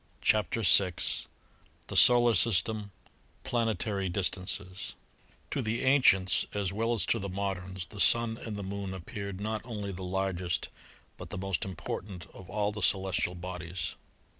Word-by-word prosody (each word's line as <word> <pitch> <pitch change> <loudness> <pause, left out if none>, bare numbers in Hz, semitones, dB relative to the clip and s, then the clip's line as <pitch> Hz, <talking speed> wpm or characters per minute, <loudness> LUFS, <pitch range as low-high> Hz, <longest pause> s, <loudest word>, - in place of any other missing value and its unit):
CHAPTER 110 +1 +2
VI 90 -1 +5 0.9
THE - - -6
SOLAR 120 -1 +7
SYSTEM 105 0 +2 0.5
PLANETARY 105 -4 0
DISTANCES 95 +1 -3 0.6
To 140 - 0
the 115 +2 -1
ancients 125 -9 +5
as 100 -2 -1
well 115 +3 +1
as 110 - +2
to 115 - +1
the 100 -1 -4
moderns 95 -1 -3
the 105 - -11
Sun 115 +1 +4
and 110 -2 -5
the 100 - -4
Moon 100 0 -4
appeared 100 +2 -6
not 110 +1 -2
only 105 -4 -5
the 95 0 -7
largest 95 -1 -1 0.5
but - - -9
the - - -5
most 95 -2 -1
im 95 -1 -5
portant 90 +2 -6
of 95 -2 -12
all 105 -1 0
the 105 0 -6
celestial 95 -2 +1
bodies. 90 -1 -5
100 Hz, 150 wpm, -30 LUFS, 95-110 Hz, 0.9 s, SOLAR